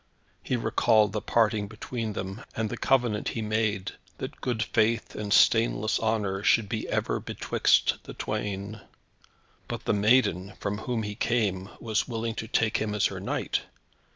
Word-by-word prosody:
He 130 - -1
recalled 110 -3 +3
the 105 - -1
parting 110 -2 +2
between 110 +1 -5
them, 95 0 -5
and 110 -1 -1
the - - -2
covenant 120 -6 +1
he 115 - -3
made, 110 -2 0 0.3
that - - -7
good 120 -3 0
faith 115 +2 +1
and 105 -1 -5
stainless 110 -1 +4
honour 105 -4 0
should 105 +1 +3
be 110 +1 -3
ever - - 0
betwixt - - +1
the - - -9
twain. 105 0 -4 0.9
But - - -5
the - - +2
maiden, 100 -3 +3
from 105 +1 -2
whom 115 -1 -2
he 105 0 -4
came, 105 -4 0
was 110 -2 -1
willing 115 -2 -2
to 110 - -8
take 110 -1 +1
him 105 -1 -2
as 105 - +2
her - - -5
knight! - - -1
110 Hz, 160 wpm, -27 LUFS, 105-115 Hz, 0.9 s, stainless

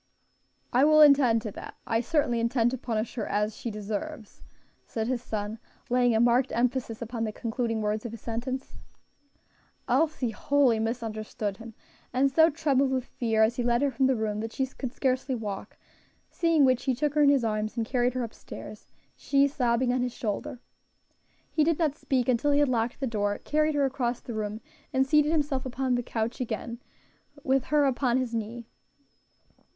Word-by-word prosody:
"I 255 +3 +5
will 305 +1 +6
attend 270 -6 +6
to 215 - -4
that; - - -9
I 225 0 +1
certainly 250 -3 +1
intend 235 0 +2
to 260 - -3
punish 225 -2 -2
her 220 -4 -3
as 210 +1 -1
she 235 - -5
deserves" 215 +4 -6 0.4
said 220 -1 -3
his 250 -2 -1
son, 215 -1 -4 0.3
laying 245 -2 +3
a - - +3
marked 245 +2 +3
emphasis 240 -1 -1
upon 230 0 -4
the 215 - -1
concluding 225 0 -2
words 210 +1 -1
of 235 - -5
his 230 - -8
sentence. 255 +3 -5 1.1
Elsie 270 -2 +1
wholly 265 -1 +2
misunderstood 220 -3 -3
him, 225 -1 -11 0.4
and 270 +2 +2
so 320 +4 +6
trembled 285 -4 +1
with 260 -1 -1
fear 225 -2 +1
as 230 +2 +1
he 245 - 0
led 240 +2 +2
her 280 - +2
from 265 +1 +2
the 265 - +2
room, 215 -2 -2
that 225 +1 -4
she 265 - 0
could 260 -1 -6
scarcely 260 0 -1
walk; 210 -4 -6 0.5
seeing 330 -4 +3
which, 255 -2 +2
he 260 -2 +1
took 295 +3 0
her 300 - +2
in 285 - +6
his 275 -3 +3
arms 215 +1 -2
and 230 - 0
carried 245 0 0
her 255 - -1
up 225 - -6
stairs, - - -10 0.3
she 280 0 +2
sobbing 245 -2 +1
on 255 - 0
his 250 -1 -2
shoulder. 215 +2 -4 0.9
He 310 - +2
did 325 0 +2
not 315 -5 +1
speak 260 -5 -1
until 255 +3 +2
he 285 - +3
had 290 -2 +3
locked 235 0 -1
the 270 - -1
door, 205 -4 -1
carried 305 0 0
her 285 -1 +3
across 250 -3 -1
the 240 - -8
room, 215 0 -4 0.3
and 265 0 +2
seated 300 +2 +3
himself 290 -4 0
upon 260 0 -1
the 245 - +1
couch 230 0 -3
again, 235 0 -4 0.6
with 265 -1 +1
her 295 -1 +3
upon 255 -2 +1
his 255 -2 -2
knee. 230 +1 -4
245 Hz, 190 wpm, -27 LUFS, 225-270 Hz, 1.1 s, will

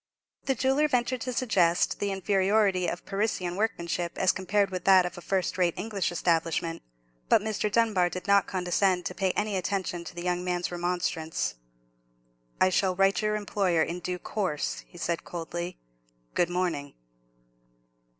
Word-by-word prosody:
The 270 - +1
jeweller 270 +5 +2
ventured 250 -2 0
to 255 - -3
suggest 185 -9 +2
the 200 -1 -1
inferiority 195 -1 +2
of 175 - -4
Parisian 195 -3 -1
workmanship 175 -5 -2
as 185 - +4
compared 195 +1 0
with 185 -2 -4
that 190 -2 +7
of 180 0 -4
a 175 - -9
first 190 +1 -1
rate 175 -2 +2
English 200 -6 -2
establishment; 165 -1 0 0.5
but - - +6
Mr. 215 0 -2
Dunbar 210 -6 +3
did 180 +1 -6
not 200 -1 +4
condescend 180 0 +1
to - - -3
pay 190 0 0
any 210 -1 -1
attention 185 -2 -2
to 170 - -9
the 175 - -5
young 180 0 0
man's 180 -1 -1
remonstrance. 175 - -1 1.1
"I 185 - +5
shall 185 0 +1
write 195 0 +3
to 215 - +1
your 210 - +1
employer 195 -5 +1
in 170 +3 -4
due 180 +1 -3
course," 180 -6 -2
he - - -15
said, 170 0 -2
coldly. 175 +1 -5 0.6
"Good 175 - +2
morning." 175 -6 -2
185 Hz, 160 wpm, -28 LUFS, 175-205 Hz, 1.1 s, that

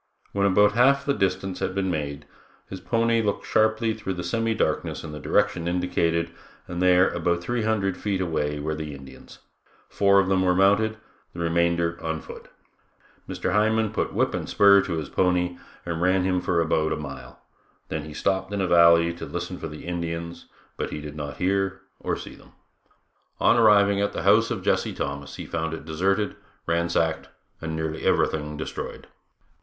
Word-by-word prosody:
When 100 0 +2
about 105 +2 +5
one 110 - -7
half 140 +3 +4
the 140 - +2
distance 95 -3 -1
had 95 0 -2
been 95 -1 0
made, 75 -2 -4 0.4
his 95 - -7
pony 115 +2 +1
looked 105 -2 -2
sharply 110 +1 +2
through 100 -4 -4
the 90 - -5
semi 115 +6 0
darkness - - -1
in 80 - -7
the 75 - -7
direction 105 +2 +1
indicated 85 -2 0 0.4
and 85 0 -4
there 90 0 +5
about 85 +1 -1
three 120 +6 -2
hundred 105 -4 0
feet 100 -2 -2
away 75 -5 -1
were 75 +2 -2
the 75 -2 -5
Indians; 65 -1 -13 0.5
four 100 0 +4
of 95 - +2
them 95 -1 +2
were 90 -1 +2
mounted, 100 +3 +3 0.4
the - - -9
remainder 85 0 +1
on 80 0 -2
foot. - - -11 0.8
Mr. - - -2
Hindman 110 0 +2
put - - -2
whip - - 0
and - - -4
spur 100 -1 +6
to 95 -2 -4
his 80 -2 -3
pony 90 -1 0 0.3
and 85 -1 -3
ran 90 +1 +3
him 90 -1 +1
for 90 -1 0
about 80 -1 +1
a - - -3
mile, 70 -4 -9 0.5
then 80 -1 -3
he 75 - -9
stopped 95 0 -1
in 100 - -2
a 95 - +1
valley 85 -1 +5
to 85 - -8
listen 90 +1 -5
for - - -5
the 75 -1 -9
Indians, 85 -1 -5 0.3
but - - -3
he - - -5
did 75 0 -8
not 70 -2 -6
hear 95 +1 0 0.2
or - - -2
see - - -9
them. - - -18 0.9
On - - +4
arriving 100 -3 +5
at 100 - 0
the - - -4
house - - +4
of - - -3
Jesse - - +1
Thomas 70 0 -5
he - - -7
found 80 0 -3
it 75 - -10
deserted, 95 +6 0 0.3
ransacked 85 -1 0 0.3
and 80 0 -4
nearly 80 0 -3
everything 75 -1 0
destroyed. 75 - -6
90 Hz, 185 wpm, -25 LUFS, 80-100 Hz, 0.9 s, spur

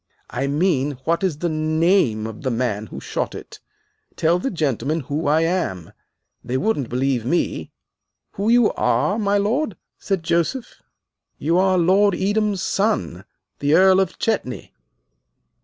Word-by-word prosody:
"I 135 +3 -2
mean, 145 -2 +1
what 170 +5 0
is 180 -6 0
the 175 - -2
name 155 - +1
of 110 -1 -7
the 135 - -1
man 115 -3 -2
who - - -8
shot - - -3
it! - - -10 0.6
Tell 170 +2 +2
the 270 - -2
gentlemen 155 - -1
who 145 +3 -3
I 155 +2 +3
am. 165 - -2 0.5
They 130 - -2
wouldn't 145 - -1
believe 125 -1 0
me." 170 +9 -1 0.6
"Who 200 +3 -2
you 240 -1 +4
are, 130 - +1
my 205 -1 +1
lord?" 215 - 0 0.2
said 195 -4 -2
Joseph. 170 +11 -1 0.6
"You 165 +4 +1
are 190 0 +3
Lord 190 +3 +3
Edam's 205 0 0
son, 195 - -1 0.3
the 145 +2 +2
Earl 190 +1 +6
of 190 -2 -1
Chetney." 210 - -2
165 Hz, 145 wpm, -21 LUFS, 135-195 Hz, 0.6 s, Earl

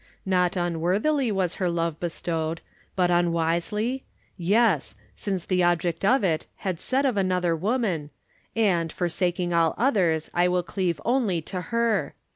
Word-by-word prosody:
Not 180 -1 +2
unworthily 185 - +1
was 190 -3 -1
her 180 - +2
love 165 -2 -1
bestowed. 165 -1 -2 0.3
But 180 -2 +2
un 175 0 +3
wisely? 190 +10 -1 0.3
yes, 200 - +2 0.2
since 190 -4 -3
the 185 -1 +1
object 175 0 +1
of 240 +4 +4
it 165 -4 0
had 185 -5 -3
said 270 +2 0
of 250 -6 +1
another 180 -3 +1
woman: 190 - -1 0.2
" - - -37
And, 180 -7 +2
forsaking 175 0 -1
all 165 -1 +3
others, 185 - +1
I 175 +1 +3
will 180 0 +1
cleave 175 -3 -2
only 235 -8 +1
to 180 +3 -5
her." 230 +2 0
180 Hz, 150 wpm, -25 LUFS, 170-210 Hz, 0.3 s, of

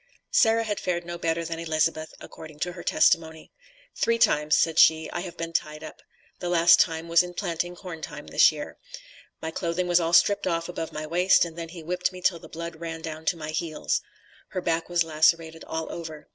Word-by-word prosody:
Sarah 230 - +4
had 210 -2 -3
fared 175 -1 -2
no 175 0 -6
better 165 0 -1
than 165 0 -4
Elizabeth, 155 -1 -1
according 155 -2 -11
to 175 - -1
her 175 0 -9
testimony. 160 -2 +1 0.4
"Three 230 0 +1
times," 150 -8 +3
said 165 0 +2
she, 160 0 +5
"I - - -3
have 175 -1 -7
been 165 0 -5
tied 155 -1 -2
up; 155 - -10 0.4
the 175 - -3
last 175 0 +6
time 165 -1 +1
was 170 +1 +5
in 180 0 -7
planting 175 -1 -3
corn 175 -3 -9
time, 150 -1 -8
this - - +5
year. 150 -1 -8 0.6
My 160 - -3
clothing 170 +2 -2
was 175 0 +4
all 165 0 -1
stripped 200 +3 +4
off 165 -1 -1
above 170 -2 -5
my 155 0 -5
waist, 180 +3 +4
and 165 -1 -9
then 165 -1 -6
he 165 -1 -10
whipped 180 +3 -1
me 185 - -9
till 180 -2 +1
the - - -13
blood 170 0 -7
ran 165 0 -6
down 160 -1 -6
to 170 - +1
my 155 -1 -5
heels." 155 0 -2 0.5
Her 185 -3 -4
back 165 -1 -1
was 175 -1 +2
lacerated 160 +1 +1
all 160 0 -4
over. 160 -3 -8
165 Hz, 215 wpm, -26 LUFS, 160-175 Hz, 0.6 s, last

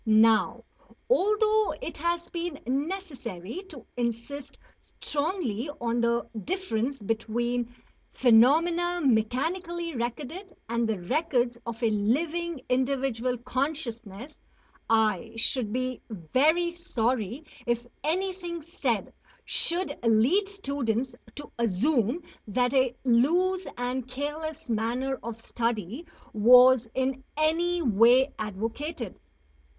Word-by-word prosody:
Now, 220 0 +4 0.5
although 425 0 +3
it - - -6
has 340 0 -1
been 340 -3 -3
necessary 270 - -4
to 280 - -11
insist 240 +4 -4 0.2
strongly 290 - -3
on 235 0 0
the 235 0 +1 0.2
difference 275 - -2
between 235 +3 -1 0.4
phenomena 330 +9 +4
mechanically 330 - 0
recorded 285 - -5
and 235 0 0
the 220 - 0
records 245 - +1
of 235 +1 -5
a 225 - +3
living 305 +9 0
individual 255 -1 0
consciousness, 250 -2 -4 0.5
I 220 -1 +2
should 225 -1 +1
be 255 +1 -2
very 285 - +2
sorry 255 - -2 0.2
if 240 0 0 0.2
anything 350 0 -2
said 260 - -2 0.3
should 340 -4 +1
lead 240 - +4
students 270 - -2 0.2
to 290 - -9
assume 235 - +1 0.2
that 245 +4 +1
a 260 -2 +3
loose 345 +10 +3
and 250 +1 -2
careless 300 +4 -5
manner 245 +4 -1
of 230 -1 -6
study 230 - -3 0.3
was 245 +2 +7
in 265 0 -1
any 340 +3 +1
way 240 +3 +5
advocated. 225 - -4
255 Hz, 100 wpm, -27 LUFS, 230-325 Hz, 0.5 s, was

